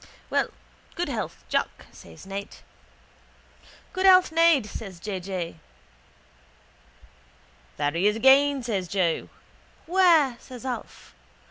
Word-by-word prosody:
—Well, -, -, +2 dB, 0.5 s
good -, -, -2 dB
health, -, -, -5 dB
Jack, -, -, -2 dB
says 80 Hz, -1 st, -14 dB
Ned. 200 Hz, +1 st, -7 dB, 1.4 s
—Good 375 Hz, +1 st, +2 dB
health, 370 Hz, -3 st, +6 dB
Ned, 330 Hz, -6 st, +4 dB
says 195 Hz, -4 st, -8 dB
J. 195 Hz, +1 st, -4 dB
J. 180 Hz, -3 st, -5 dB, 1.1 s
— -, -, -30 dB
There 145 Hz, -, 0 dB
he 170 Hz, +6 st, +1 dB
is 210 Hz, -, +2 dB
again, 270 Hz, +3 st, +4 dB
says 200 Hz, -6 st, -2 dB
Joe. 175 Hz, -3 st, -1 dB, 0.6 s
—Where? 330 Hz, -8 st, +4 dB
says 255 Hz, 0 st, -11 dB
Alf. 255 Hz, -2 st, -7 dB
225 Hz, 115 wpm, -25 LUFS, 185-285 Hz, 1.4 s, health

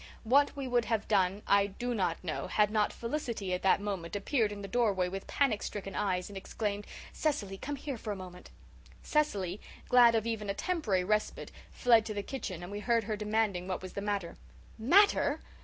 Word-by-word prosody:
What 280 Hz, +6 st, +4 dB
we 275 Hz, -2 st, -4 dB
would 245 Hz, -2 st, +2 dB
have 220 Hz, -1 st, -1 dB
done 195 Hz, -1 st, +2 dB
I 200 Hz, 0 st, +4 dB
do 240 Hz, +5 st, -4 dB
not 185 Hz, -7 st, -1 dB
know 160 Hz, -4 st, -3 dB
had 210 Hz, -1 st, +2 dB
not 215 Hz, -1 st, +2 dB
Felicity 230 Hz, -7 st, -3 dB
at 180 Hz, -, -1 dB
that 190 Hz, 0 st, +4 dB
moment 195 Hz, -4 st, -4 dB
appeared 215 Hz, +1 st, +1 dB
in 205 Hz, -1 st, -7 dB
the -, -, -5 dB
doorway 205 Hz, -6 st, +1 dB
with 195 Hz, +1 st, -6 dB
panic 260 Hz, -7 st, +1 dB
stricken 195 Hz, -2 st, -5 dB
eyes 185 Hz, -3 st, -1 dB
and 205 Hz, -, -10 dB
exclaimed, 205 Hz, +1 st, -3 dB, 0.3 s
"Cecily, 210 Hz, -11 st, -1 dB
come 290 Hz, +9 st, -5 dB
here 275 Hz, -3 st, -5 dB
for 215 Hz, -, -4 dB
a -, -, -2 dB
moment." 180 Hz, -1 st, -10 dB, 0.5 s
Cecily, 205 Hz, -, 0 dB, 0.3 s
glad 240 Hz, -2 st, +7 dB
of 220 Hz, -1 st, +1 dB
even 220 Hz, -3 st, -3 dB
a 200 Hz, -, -1 dB
temporary 230 Hz, -, 0 dB
respite, 210 Hz, +3 st, -1 dB, 0.2 s
fled 235 Hz, -3 st, +4 dB
to 215 Hz, -, -4 dB
the 205 Hz, -, -2 dB
kitchen 190 Hz, -10 st, -5 dB
and 175 Hz, -, -7 dB
we 205 Hz, -, -4 dB
heard 230 Hz, +1 st, +2 dB
her 215 Hz, +1 st, -2 dB
demanding 210 Hz, -3 st, 0 dB
what 190 Hz, 0 st, -3 dB
was 185 Hz, -, -7 dB
the 200 Hz, -, -4 dB
matter. 200 Hz, -4 st, -2 dB, 0.4 s
"Matter!" 380 Hz, -, +4 dB
210 Hz, 200 wpm, -31 LUFS, 195-235 Hz, 0.5 s, glad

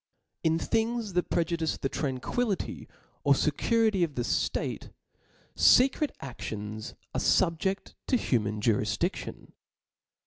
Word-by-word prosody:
In 160 Hz, 0 st, +3 dB
things 225 Hz, +1 st, -1 dB
that 180 Hz, 0 st, 0 dB
prejudice 165 Hz, -2 st, 0 dB
the -, -, -1 dB
tranquillity 145 Hz, -, -2 dB, 0.4 s
or -, -, +5 dB
fecurity 220 Hz, -5 st, +2 dB
of 155 Hz, -5 st, -2 dB
the 120 Hz, -, -1 dB
ftate, -, -, -1 dB, 0.6 s
fecret 270 Hz, +3 st, +5 dB
aftions 110 Hz, -4 st, -6 dB, 0.2 s
arc -, -, -1 dB
fubjeft 180 Hz, +4 st, +1 dB
to 255 Hz, -, +3 dB
humaa 110 Hz, -, 0 dB
jurifiJiAion. 105 Hz, -1 st, -1 dB
165 Hz, 105 wpm, -29 LUFS, -, 0.6 s, or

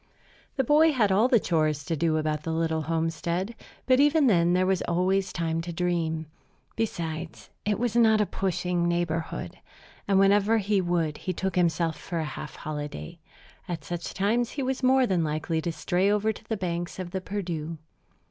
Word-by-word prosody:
The 265 Hz, -, +1 dB
boy 305 Hz, +4 st, +5 dB
had 215 Hz, -7 st, +2 dB
all 210 Hz, +6 st, +4 dB
the 250 Hz, -3 st, +4 dB
chores 155 Hz, -5 st, 0 dB
to 165 Hz, -, -1 dB
do 160 Hz, +1 st, +1 dB
about 155 Hz, -1 st, -1 dB
the 165 Hz, -, -4 dB
little 160 Hz, -1 st, 0 dB
homestead; 165 Hz, +5 st, -2 dB, 0.3 s
but 255 Hz, 0 st, +4 dB
even 295 Hz, +1 st, +4 dB
then 175 Hz, -7 st, +4 dB
there 185 Hz, +1 st, +3 dB
was 190 Hz, -1 st, +1 dB
always 185 Hz, +2 st, +1 dB
time 165 Hz, -1 st, -1 dB
to 170 Hz, +1 st, -5 dB
dream. 165 Hz, -2 st, -1 dB, 0.5 s
Besides, 165 Hz, -7 st, -4 dB
it 210 Hz, 0 st, +1 dB
was 235 Hz, -1 st, -1 dB
not 220 Hz, -2 st, +5 dB
a 210 Hz, -, +3 dB
pushing 180 Hz, -2 st, -1 dB
neighborhood; 170 Hz, -2 st, -2 dB, 0.5 s
and 195 Hz, -, +3 dB
whenever 200 Hz, +3 st, +4 dB
he 205 Hz, -1 st, +1 dB
would 170 Hz, -4 st, -1 dB
he 185 Hz, -, -3 dB
took 190 Hz, +2 st, -2 dB
for -, -, +1 dB
himself 165 Hz, -2 st, 0 dB
a 165 Hz, -2 st, 0 dB
half 150 Hz, -, -7 dB
holiday. 145 Hz, -, -6 dB, 0.5 s
At 165 Hz, -4 st, -4 dB
such 170 Hz, +3 st, -5 dB
times 225 Hz, +5 st, +1 dB
he 280 Hz, -, -2 dB
was 265 Hz, 0 st, -2 dB
more 260 Hz, 0 st, +4 dB
than 185 Hz, -6 st, +1 dB
likely 155 Hz, +1 st, -1 dB
to 170 Hz, -, -2 dB
stray 180 Hz, +4 st, +1 dB
over 210 Hz, +1 st, +2 dB
to -, -, -13 dB
the 220 Hz, -, -2 dB
banks 175 Hz, -2 st, -3 dB
of 185 Hz, -2 st, -5 dB
the 190 Hz, -, -3 dB
Perdu. 170 Hz, -5 st, -4 dB
175 Hz, 185 wpm, -27 LUFS, 165-205 Hz, 0.5 s, boy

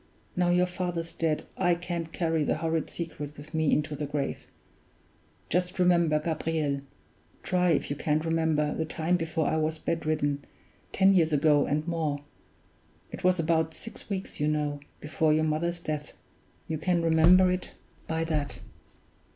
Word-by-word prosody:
Now 180 Hz, -1 st, +2 dB
your 180 Hz, +1 st, +4 dB
father's 175 Hz, -2 st, -3 dB
dead, 160 Hz, -2 st, 0 dB
I 175 Hz, -2 st, +3 dB
can't 170 Hz, -2 st, -4 dB
carry 165 Hz, -3 st, 0 dB
the -, -, 0 dB
horrid 160 Hz, 0 st, -1 dB
secret 150 Hz, -3 st, -6 dB
with 150 Hz, +3 st, -11 dB
me 160 Hz, -2 st, +2 dB
into 150 Hz, 0 st, +1 dB
the 145 Hz, 0 st, -3 dB
grave. 145 Hz, -1 st, -3 dB, 1.0 s
Just 180 Hz, +2 st, 0 dB
remember, 170 Hz, -4 st, +4 dB
Gabriel 155 Hz, -3 st, -1 dB, 0.6 s
try 180 Hz, -1 st, +2 dB
if 160 Hz, -, +1 dB
you -, -, 0 dB
can't 155 Hz, +2 st, 0 dB
remember 160 Hz, -2 st, +1 dB
the 160 Hz, -, -1 dB
time 160 Hz, +2 st, 0 dB
before 165 Hz, -2 st, -1 dB
I 160 Hz, -, +1 dB
was 155 Hz, 0 st, 0 dB
bedridden, 155 Hz, -3 st, -1 dB, 0.5 s
ten 195 Hz, 0 st, +5 dB
years 165 Hz, -4 st, +3 dB
ago 150 Hz, 0 st, +4 dB
and 150 Hz, +3 st, -1 dB
more 155 Hz, -4 st, -1 dB, 0.9 s
it -, -, -8 dB
was 185 Hz, 0 st, +4 dB
about 160 Hz, -1 st, +1 dB
six 225 Hz, -, -8 dB
weeks, 195 Hz, -1 st, -4 dB
you 150 Hz, -, +1 dB
know, 150 Hz, -1 st, 0 dB, 0.2 s
before 155 Hz, +1 st, +1 dB
your 155 Hz, +1 st, +2 dB
mother's 165 Hz, +3 st, 0 dB
death; 150 Hz, -3 st, -4 dB, 0.5 s
you 160 Hz, -2 st, -2 dB
can 175 Hz, +1 st, +1 dB
remember 170 Hz, +3 st, +6 dB
it 180 Hz, 0 st, -3 dB, 0.3 s
by 160 Hz, 0 st, -1 dB
that. 155 Hz, -3 st, -1 dB
160 Hz, 160 wpm, -28 LUFS, 150-170 Hz, 1.0 s, remember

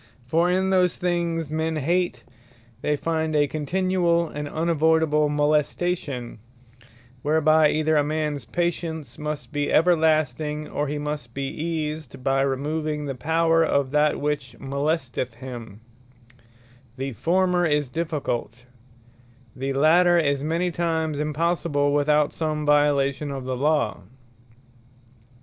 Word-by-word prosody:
For 165 Hz, +7 st, +2 dB
in 190 Hz, +1 st, +1 dB
those 180 Hz, -2 st, +3 dB
things 170 Hz, -3 st, -1 dB
men 160 Hz, +1 st, -1 dB
hate, 155 Hz, -3 st, 0 dB, 0.6 s
they 150 Hz, -, +1 dB
find 160 Hz, +1 st, -1 dB
a 145 Hz, -1 st, +3 dB
continuall, 170 Hz, +2 st, 0 dB
and 150 Hz, 0 st, -5 dB
unavoydable 160 Hz, -1 st, +2 dB
molestation; 145 Hz, -3 st, -1 dB, 0.8 s
whereby 155 Hz, 0 st, +4 dB
either 155 Hz, +1 st, +1 dB
a 145 Hz, -, +4 dB
mans 150 Hz, -2 st, -2 dB
patience 165 Hz, -1 st, -3 dB
must 150 Hz, -1 st, -5 dB
be 145 Hz, 0 st, -1 dB
everlasting, 155 Hz, -3 st, +2 dB
or 145 Hz, -, -2 dB
he 150 Hz, +2 st, -3 dB
must 145 Hz, -5 st, -5 dB
be 140 Hz, 0 st, -2 dB
eased 155 Hz, -4 st, -4 dB
by 135 Hz, 0 st, +2 dB
removing 150 Hz, +3 st, -1 dB
the 140 Hz, -, -3 dB
power 165 Hz, +4 st, +2 dB
of 140 Hz, -4 st, +1 dB
that 150 Hz, 0 st, +2 dB
which 145 Hz, -5 st, -2 dB
molesteth 135 Hz, -3 st, -2 dB
him; 115 Hz, -4 st, -9 dB, 1.2 s
The 135 Hz, +1 st, -3 dB
former 180 Hz, -, +2 dB
is 150 Hz, -2 st, +1 dB
difficult; 135 Hz, -6 st, -3 dB, 0.9 s
the 135 Hz, +1 st, -3 dB
later 170 Hz, +5 st, +4 dB
is 140 Hz, -4 st, +1 dB
many 170 Hz, +3 st, 0 dB
times 160 Hz, -3 st, -1 dB
impossible, 150 Hz, -1 st, 0 dB
without 150 Hz, 0 st, +2 dB
some 155 Hz, -2 st, -2 dB
violation 145 Hz, -1 st, +2 dB
of 135 Hz, -2 st, -5 dB
the 130 Hz, 0 st, -2 dB
Law. 140 Hz, -5 st, 0 dB
150 Hz, 120 wpm, -24 LUFS, 140-165 Hz, 1.2 s, whereby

